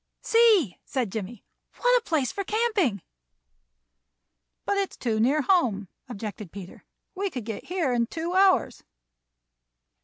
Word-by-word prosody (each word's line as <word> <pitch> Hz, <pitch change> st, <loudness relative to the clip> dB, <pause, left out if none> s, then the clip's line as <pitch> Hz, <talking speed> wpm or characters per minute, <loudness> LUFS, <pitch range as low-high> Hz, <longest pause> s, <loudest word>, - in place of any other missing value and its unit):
"See," 440 Hz, -, +4 dB
said 250 Hz, -7 st, -2 dB
Jimmie, 215 Hz, +1 st, -6 dB, 0.3 s
"what -, -, +3 dB
a -, -, -21 dB
place 300 Hz, -, 0 dB
for 395 Hz, -, -4 dB
camping!" 415 Hz, -, 0 dB, 1.6 s
"But 400 Hz, -, 0 dB
it 395 Hz, -1 st, -1 dB
is -, -, -14 dB
too 225 Hz, -3 st, -1 dB
near 275 Hz, +7 st, +2 dB
home," 230 Hz, -, +1 dB, 0.2 s
objected 210 Hz, -4 st, -7 dB
Peter. 190 Hz, -2 st, -11 dB, 0.3 s
"We 395 Hz, +1 st, -2 dB
could 250 Hz, -, -6 dB
get 220 Hz, -2 st, -6 dB
here 340 Hz, -8 st, -1 dB
in 235 Hz, -1 st, +1 dB
two 335 Hz, +5 st, -4 dB
hours." 380 Hz, 0 st, +3 dB
280 Hz, 140 wpm, -26 LUFS, -, 1.6 s, See